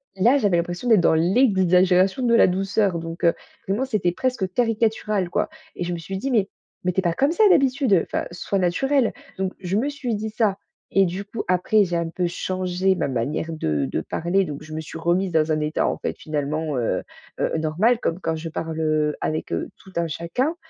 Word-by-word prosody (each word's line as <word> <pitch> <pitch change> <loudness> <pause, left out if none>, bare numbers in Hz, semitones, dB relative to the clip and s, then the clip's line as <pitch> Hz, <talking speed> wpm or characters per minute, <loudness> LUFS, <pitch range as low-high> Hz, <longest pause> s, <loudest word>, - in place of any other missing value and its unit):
là, 235 +9 +4
j'avais 200 -8 +2
l'impression 175 +7 -3
d'être 220 -5 +6
dans - - +4
l'exagération 185 +1 +3
de 235 - +3
la - - +6
douceur 195 0 +1
donc 165 +1 -7
heu, 170 - +5 0.3
vraiment, 205 +7 0
c'était 210 -9 0
presque 240 -5 -1
caricatural, 220 -4 0
quoi - - 0 0.3
et - - -3
je 175 0 -2
me - - -3
suis 190 +4 -5
dit: 265 +7 -3
«Mais 205 -4 +2 0.4
mais 180 - +1
tu 190 - +1
es - - -15
pas 170 -2 +1
comme 275 - +2
ça, 435 - +3
d'habitude, 270 - +4
enfin - - -2
soit 195 +3 -2
naturelle.» 250 +8 +1 0.2
Donc, 190 -1 -2
je 185 0 -3
me 260 +7 +1
suis 275 -5 -3
dit 215 +1 -3
ça 215 -3 +1 0.3
et 195 0 +4
du 185 +3 -4
coup, 215 +2 -5
après, 185 +4 +3
j'ai 175 -2 -1
un 170 -1 -1
peu 175 +2 -1
changé 185 +1 -1
ma - - -1
manière 135 +6 -2
de 75 - -1
de - - -1
parler, 185 +4 0
donc 145 -3 -6
je 155 - -12
me 155 - -3
suis 160 - -8
remise 175 +3 +1
dans 160 0 +2
un 155 - +1
état, 150 +1 0
en - - -2
fait, - - -3
finalement, 150 0 -2
heu 120 -2 0 0.4
heu, - - 0
normal 170 +10 +2
comme 165 -5 -2
quand 160 -2 -1
je 165 +1 -5
parle, 160 0 -4
heu, 155 -1 +1
avec 155 0 -2
heu, 85 - -2
tout 190 - -16
un 170 0 +1
chacun 210 - -2
185 Hz, 215 wpm, -23 LUFS, 165-215 Hz, 0.4 s, d'être